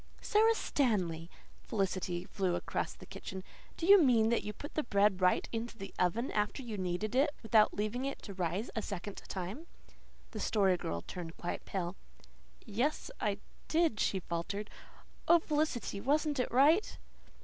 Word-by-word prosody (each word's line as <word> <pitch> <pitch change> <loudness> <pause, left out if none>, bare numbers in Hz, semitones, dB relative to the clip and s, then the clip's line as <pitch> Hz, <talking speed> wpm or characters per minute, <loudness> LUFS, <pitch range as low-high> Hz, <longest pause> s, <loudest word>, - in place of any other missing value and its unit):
"Sara 445 +1 +4
Stanley!" 180 - 0 0.3
Felicity 185 -3 -1
flew 185 -3 -1
across - - -2
the - - -13
kitchen. 190 0 -7 0.3
"Do 330 - -2
you 400 +1 +9
mean 235 -6 +4
that 235 - +2
you 210 - -3
put 290 +7 -9
the 310 - +1
bread 200 -6 +2
right 180 - +3
into 230 0 -4
the 195 - -8
oven 210 +8 +1
after 210 +6 -1
you 230 -3 -5
kneaded 185 +3 -2
it 270 +4 +4
without 220 -1 +4
leaving 215 +5 -1
it 275 - -3
to 200 - -7
rise 185 +4 -2
a 220 - 0
second 200 0 -5
time?" 195 - -5 0.6
The 215 - -6
Story 195 -3 +3
Girl 85 - -3
turned 170 -2 -7
quite 175 - -4
pale. 180 -1 -3 0.7
"Yes, 245 - -1
I - - 0 0.3
did," 320 -10 +2
she 190 - +1
faltered. 190 +5 -4 0.6
"Oh, 340 - +8
Felicity, 300 -10 -1
wasn't 295 +2 +1
it 250 - 0
right?" 300 - +4
210 Hz, 160 wpm, -33 LUFS, 185-270 Hz, 0.7 s, you